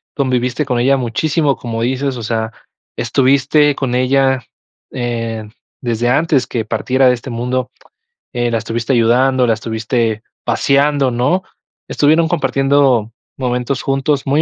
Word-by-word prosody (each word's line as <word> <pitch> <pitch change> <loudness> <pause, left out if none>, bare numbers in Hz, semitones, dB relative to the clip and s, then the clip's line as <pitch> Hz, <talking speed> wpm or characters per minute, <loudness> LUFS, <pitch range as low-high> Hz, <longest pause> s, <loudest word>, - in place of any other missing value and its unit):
conviviste 130 +1 0
con 125 -3 -1
ella 135 +3 +3
muchísimo, 140 +4 0
como 115 -2 -5
dices, 130 +2 -1
o 120 - -6
sea, 110 0 -2 0.5
estuviste 140 +4 +2
con 130 -3 -2
ella, 130 0 +2 0.5
eh, 115 -3 -3 0.3
desde 120 -1 -1
antes 135 -2 +2
que 115 -3 -3
partiera 130 +4 +1
de 125 - +5
este 125 +2 -6
mundo, 125 +1 -2 0.6
eh, 120 -1 0
la 115 - +1
estuviste 115 +4 -2
ayudando, 125 +2 +3
la 115 - +3
estuviste 110 0 -2 0.2
paseando, 140 -1 +2
¿no? 145 +11 +1 0.5
Estuvieron 160 +3 +3
compartiendo 135 -7 +2 0.3
momentos 125 0 -2
juntos 135 +1 -1
muy 145 +3 +3
125 Hz, 135 wpm, -16 LUFS, 120-140 Hz, 0.6 s, de